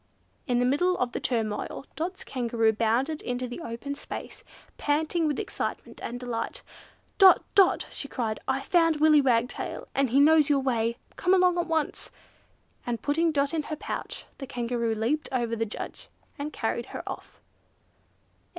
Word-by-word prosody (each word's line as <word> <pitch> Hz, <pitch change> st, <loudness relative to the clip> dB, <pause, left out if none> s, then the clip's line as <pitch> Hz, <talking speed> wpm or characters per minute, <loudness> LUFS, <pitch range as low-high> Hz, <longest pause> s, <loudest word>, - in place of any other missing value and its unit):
In 245 Hz, -2 st, +2 dB
the 245 Hz, -, +3 dB
middle 355 Hz, +8 st, +2 dB
of 250 Hz, -1 st, 0 dB
the -, -, -3 dB
turmoil, 225 Hz, +1 st, -2 dB
Dot's 355 Hz, +4 st, -3 dB
Kangaroo 235 Hz, -3 st, +1 dB
bounded 235 Hz, +8 st, +1 dB
into 245 Hz, 0 st, -3 dB
the 245 Hz, +7 st, -7 dB
open 235 Hz, +2 st, -5 dB
space, 285 Hz, -, -8 dB, 0.4 s
panting 315 Hz, +3 st, +1 dB
with 295 Hz, -, 0 dB
excitement -, -, -4 dB
and 245 Hz, +1 st, -5 dB
delight. 245 Hz, -2 st, -4 dB, 0.6 s
"Dot! 385 Hz, -2 st, +8 dB
Dot!" 390 Hz, -2 st, +5 dB
she 280 Hz, -, -4 dB
cried, 225 Hz, -6 st, -2 dB
"I've 265 Hz, +1 st, 0 dB
found 330 Hz, -2 st, +4 dB
Willy 305 Hz, 0 st, +6 dB
Wagtail, 245 Hz, -2 st, 0 dB
and 275 Hz, -2 st, +2 dB
he 265 Hz, +4 st, +4 dB
knows 305 Hz, 0 st, +6 dB
your 290 Hz, -, +4 dB
way! 235 Hz, -3 st, 0 dB, 0.2 s
Come 370 Hz, +1 st, +3 dB
along 360 Hz, -1 st, +4 dB
at 345 Hz, -, -1 dB
once!" 320 Hz, -2 st, -1 dB, 0.7 s
And, 235 Hz, -2 st, -3 dB
putting 325 Hz, +3 st, +2 dB
Dot 280 Hz, 0 st, +1 dB
in 320 Hz, -, +1 dB
her 305 Hz, +1 st, -5 dB
pouch, -, -, -5 dB
the 270 Hz, -, -6 dB
Kangaroo 235 Hz, -2 st, -1 dB
leaped 245 Hz, +8 st, -1 dB
clean 255 Hz, -2 st, 0 dB
over 230 Hz, 0 st, -2 dB
the 225 Hz, 0 st, -1 dB
judge 205 Hz, -, -7 dB, 0.3 s
and 295 Hz, +2 st, -3 dB
carried -, -, -2 dB
her -, -, -7 dB
off! -, -, -8 dB
275 Hz, 170 wpm, -27 LUFS, 235-315 Hz, 0.7 s, Dot